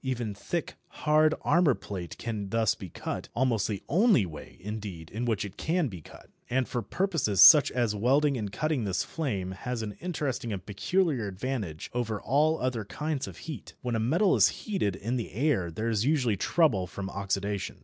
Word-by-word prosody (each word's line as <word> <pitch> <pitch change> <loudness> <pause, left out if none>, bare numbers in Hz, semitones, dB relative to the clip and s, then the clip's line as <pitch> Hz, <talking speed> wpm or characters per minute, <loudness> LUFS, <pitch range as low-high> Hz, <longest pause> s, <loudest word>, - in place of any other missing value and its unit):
Even 120 -5 -2
thick, 165 +11 -4
hard 155 0 +2
armour 150 -3 +4
plate 90 -4 -7
can 105 -4 -4
thus 115 0 +2
be 95 - -9
cut, - - -5
almost 120 -4 +1
the 100 -3 -4
only 190 - +4
way, 80 -4 -10
indeed, 100 -5 -6
in 115 +3 -3
which 110 -4 0
it 100 0 -9
can 165 -3 0
be 90 -5 -9
cut. - - -15 0.2
And 130 0 +1
for 120 - -2
purposes 165 - -1
such 150 +8 +10
as 120 -4 0
welding 135 +7 +3
and 105 -5 -3
cutting 155 +2 -1
this 95 -3 0
flame 105 - -3
has 125 +3 -4
an 105 - -4
interesting 145 -9 -2
and 95 -3 -5
peculiar 130 - 0
advantage 100 -5 -4
over 115 -3 -2
all 155 +4 +2
other 125 -3 -1
kinds 150 +6 -3
of - - -9
heat. 150 - -8
When 120 -2 -1
a - - +1
metal 165 - +3
is - - +6
heated 190 - -2
in 115 +6 -2
the 115 - -5
air 120 - +1
there 110 +8 -3
is 110 -2 +1
usually 130 -6 +2
trouble 105 - +2
from 100 +1 -6
oxidation. 100 0 -3
115 Hz, 190 wpm, -28 LUFS, 100-145 Hz, 0.2 s, such